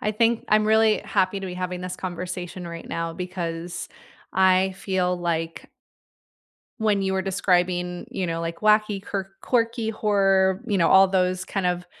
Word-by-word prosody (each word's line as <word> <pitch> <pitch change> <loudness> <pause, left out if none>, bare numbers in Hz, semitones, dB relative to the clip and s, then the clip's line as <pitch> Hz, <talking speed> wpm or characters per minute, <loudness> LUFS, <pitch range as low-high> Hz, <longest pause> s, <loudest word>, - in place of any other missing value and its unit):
I 210 - -1
think 230 +1 +1
I'm 215 0 +4
really 220 0 +4
happy 200 -1 0
to 190 - -5
be 180 - -6
having 180 0 -4
this 180 0 -5
conversation 180 0 -5
right 170 0 -8
now, 165 0 -3
because 175 -1 -5 0.4
I 190 0 +4
feel 185 -2 0
like 165 -1 -3 1.1
When 210 -3 +2
you 190 0 0
were 190 - 0
describing, 180 -2 0
you 185 - -2
know, 165 0 -2
like 165 0 -4
wacky, 215 -1 +3
kirk 195 -1 -5
quirky, 230 -2 0
horror, 195 -3 +2
you 205 -4 0
know, 170 - +4
all 190 0 +7
those 185 -1 0
kind 195 -1 -2
of 180 0 -1
190 Hz, 165 wpm, -24 LUFS, 180-200 Hz, 1.1 s, all